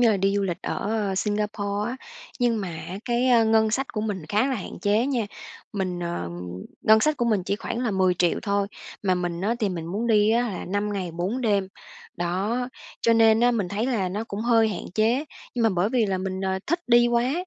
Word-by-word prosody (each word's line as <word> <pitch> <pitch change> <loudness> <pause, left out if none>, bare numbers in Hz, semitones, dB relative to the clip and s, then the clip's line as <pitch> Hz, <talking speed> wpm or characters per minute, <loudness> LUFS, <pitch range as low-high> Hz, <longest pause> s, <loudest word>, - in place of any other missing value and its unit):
như 235 -2 +6
là 205 - +2
đi 195 +1 +1
du 200 - +1
lịch 180 -3 -3
ở 205 -2 -1
Singapore 210 +1 -1
á, 255 - -5 0.4
nhưng 230 -3 +2
mà 190 - -3
á 175 +3 -6
cái, 245 +1 +1
ờ, 235 -3 +5
ngân 220 0 +3
sách 270 +4 -1
của 215 - -2
mình 205 -5 -3
khá 215 +8 +2
là 265 - 0
hạn 200 - -6
chế 210 +4 +2
nha. 250 -6 0 0.5
Mình, 185 -3 -2
ờ 170 - -3 0.5
ngân 220 0 +6
sách 305 +5 +2
của 240 - 0
mình 215 -5 +2
chỉ 200 - -1
khoảng 225 - -4
là 240 - 0
10.000.000 185 -3 +2
thôi, 200 -1 +1 0.4
mà 190 -2 +2
mình 175 -1 -2
á 210 +5 +1
thì 210 - +2
mình 170 -3 -4
muốn 205 +7 -2
đi 215 -2 +4
á 235 +2 +3
là 190 - -5
5 205 +2 -1
ngày 190 -3 -3
4 185 +9 -2
đêm, 200 -5 +1 0.5
đó, 200 +9 -1 0.3
cho 230 - +4
nên 225 -1 +5
á 245 +1 +5
mình 205 -7 -1
thấy 215 +5 -1
là 215 -8 0
nó 205 +5 -3
cũng 205 -2 -5
hơi 225 -1 +4
hạn 195 - -4
chế. 230 +6 +2 0.3
Nhưng 240 - 0
mà 225 - +5
bởi 185 0 +1
vì 235 -4 +2
là 190 -1 -1
mình, 190 0 -3
ờ, 190 0 -1
thích 340 +3 0
đi 240 0 +6
quá, 240 +2 +2
210 Hz, 235 wpm, -25 LUFS, 190-230 Hz, 0.5 s, như